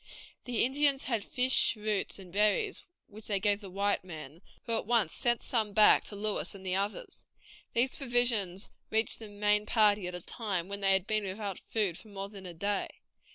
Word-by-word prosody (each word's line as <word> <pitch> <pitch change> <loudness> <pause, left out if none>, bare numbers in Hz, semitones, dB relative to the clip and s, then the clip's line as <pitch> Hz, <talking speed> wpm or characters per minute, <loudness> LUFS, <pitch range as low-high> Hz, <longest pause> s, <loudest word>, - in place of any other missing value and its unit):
These 245 -3 +1
Indians 275 +1 +2
had 230 -5 -1
fish, 255 +1 +1
roots, 210 -2 -1
and 185 -3 -12
berries, 215 - +1 0.2
which 215 +1 -11
they 200 -2 +1
gave 205 +1 +1
the 195 - -9
white 200 +2 0
men, 160 -2 -10 0.2
who 230 -1 -1
at 225 - -2
once 230 -8 +2
sent 240 -1 +1
some 220 -4 0
back 215 0 +7
to 205 - -4
Lewis 205 0 0
and 190 -1 -11
the 185 - -1
others. 205 - -4 0.5
These 250 +3 +1
provisions 240 -8 +1 0.2
reached 220 +1 +1
the 220 -2 -8
main 210 +1 +1
party 210 -4 +4
at 180 - -5
a 180 - -5
time 190 -4 -3
when 200 0 -5
they 195 -1 +4
had 190 -1 +1
been 215 -1 0
without 195 0 -4
food 200 -7 -1
for - - -15
more 200 -1 -6
than 195 -2 -9
a 175 - -6
day. 200 +3 -1
210 Hz, 200 wpm, -30 LUFS, 195-225 Hz, 0.5 s, back